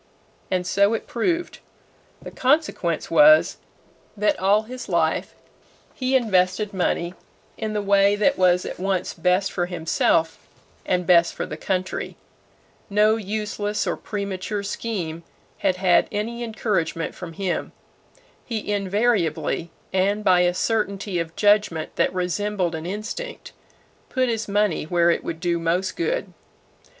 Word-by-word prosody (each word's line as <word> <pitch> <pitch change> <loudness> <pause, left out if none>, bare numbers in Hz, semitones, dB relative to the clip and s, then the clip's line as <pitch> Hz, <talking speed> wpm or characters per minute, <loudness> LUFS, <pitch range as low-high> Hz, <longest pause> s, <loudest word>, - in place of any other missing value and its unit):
And 180 -1 0
so 200 +4 +3
it - - -5
proved. 340 +8 -2 0.6
The - - -8
consequence 260 - 0
was, 305 +1 +6 0.6
that 210 +1 +1
all 200 +3 +3
his 250 +1 -8
life 165 -3 0 0.6
he 260 0 -1
invested 200 -3 +2
money 175 -1 -1 0.4
in 220 -1 -4
the 210 -1 -1
way 200 0 +4
that 215 +7 +2
was 180 -1 +3
at - - -6
once 190 -1 -1
best 180 +3 +1
for 175 -1 -1
himself 165 -1 +1 0.5
and 180 -1 +1
best 170 -1 +4
for - - -3
the - - -6
country. 185 -1 -3 0.7
No 210 +2 +4
useless 210 0 -2
or - - -1
premature 200 0 -4
scheme 190 -6 -4 0.4
had 185 - +1
had 185 -1 +3
any 230 +3 -3
encouragement 205 -8 -2
from 175 -3 -8
him. 185 0 -2 0.7
He 215 -3 -3
invariably, 200 -4 0 0.2
and 200 +3 +1
by 185 -3 +5
a 175 0 +2
certainty 200 -3 -1
of 165 0 -4
judgment 205 -6 +2
that - - +2
resembled 185 0 -1
an 160 +1 -5
instinct, 215 - -6 0.6
"put 255 -1 +1
his 225 -2 -2
money 205 -5 +1
where 170 +1 +3
it - - -1
would 165 -1 -5
do 170 0 0
most 180 +3 0
good." - - -2
195 Hz, 135 wpm, -23 LUFS, 180-215 Hz, 0.7 s, was